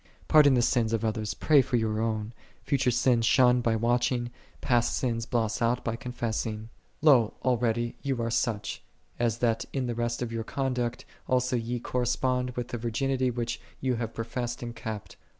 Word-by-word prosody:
Pardon 145 -3 +6
the 120 - +3
sins 115 -2 +1
of 115 0 0
others, 110 -3 -2
pray 145 - +5
for 125 - -2
your 110 -2 0
own: 110 0 -2 0.3
future 135 -3 +1
.sins 120 -1 +2
shun 125 0 +5
by 115 -1 +1
watching, 120 +1 +1 0.3
past 120 -1 +1
sins 115 -3 -1
blot 115 -1 -1
out 120 +2 +1
by 115 - -1
confessing. 115 -2 -4 0.3
54. 150 -1 +8
Lo, 115 -5 +2
already 120 -1 +1
ye 140 - -2
are 115 -2 -2
such, 110 -2 -1 0.4
as 115 -2 +1
that 115 -2 0
in 135 -2 -1
the 120 - -2
rest 120 +1 -2
of 120 - -4
your 115 -1 -3
conduct 125 -1 -2 0.2
also 125 0 +1
ye 120 +1 -2
correspond 125 +1 0
with 125 0 -3
the 120 - -4
virginity 130 +3 0
which 120 -1 -3 0.2
ye 130 -1 0
have 115 -1 -4
professed 120 +1 -4
and 120 0 -6
kept. 110 -2 -6
120 Hz, 180 wpm, -28 LUFS, 115-125 Hz, 0.4 s, 54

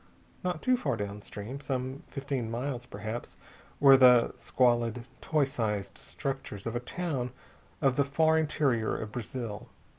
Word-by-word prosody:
Not 180 -3 -2
too 255 0 +4
far 135 - -1
downstream 105 +4 -6
some 130 0 -3
fifteen 135 -4 -3
miles, 125 +1 -3
perhaps 110 +3 -6 0.4
were 135 -1 +9
the 125 -2 +6
squalid, 120 -2 +1 0.2
toy 150 -3 +2
sized 105 -7 -2
structures 135 -8 -5
of 115 0 -3
a - - +1
town 135 -1 -3 0.5
of 135 -2 +3
the 140 - +5
far 160 +3 +3
interior 140 -7 +1
of 110 -1 -5
Brazil. 115 -2 -5
125 Hz, 140 wpm, -30 LUFS, 115-140 Hz, 0.5 s, were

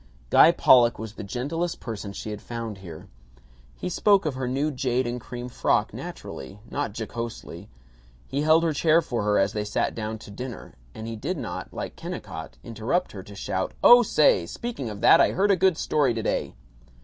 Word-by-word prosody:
Guy - - +8
Pollock 120 -2 +5
was 110 -1 -7
the - - -8
gentlest 145 - -3
person 110 -4 -6
she 105 +2 -6
had 105 -1 -6
found 115 -4 -6
here. 85 -1 -10 0.7
He - - -4
spoke 195 +1 +3
of 150 - 0
her 130 -1 -3
new 140 +4 0
jade 130 -2 0
and 120 0 -4
cream 120 +1 -7
frock 125 - 0
naturally, 65 +9 -8
not 145 -8 -3
jocosely; 110 -4 -6 0.6
he 140 - -2
held 160 +2 +4
her 165 -2 +1
chair 160 +3 +3
for 120 -6 -2
her 105 0 +2
as 95 +2 +2
they 105 - -2
sat 105 - -1
down 110 0 -4
to 105 - -12
dinner; 125 +4 -8 0.2
and 110 - -7
he 115 0 -5
did 155 +12 -3
not, 125 -6 -6
like - - -6
Kennicott, 80 0 -7
interrupt 115 - -2
her 95 - -8
to 100 +2 -12
shout, 95 -1 -3
"Oh 245 0 +9
say, 150 - +3
speaking 230 - -5
of 105 -1 -8
that, - - +7
I - - +3
heard 200 +2 +2
a - - +5
good 185 -2 +3
story 140 -8 +1
today." 110 - -2
120 Hz, 195 wpm, -25 LUFS, 105-150 Hz, 0.7 s, Oh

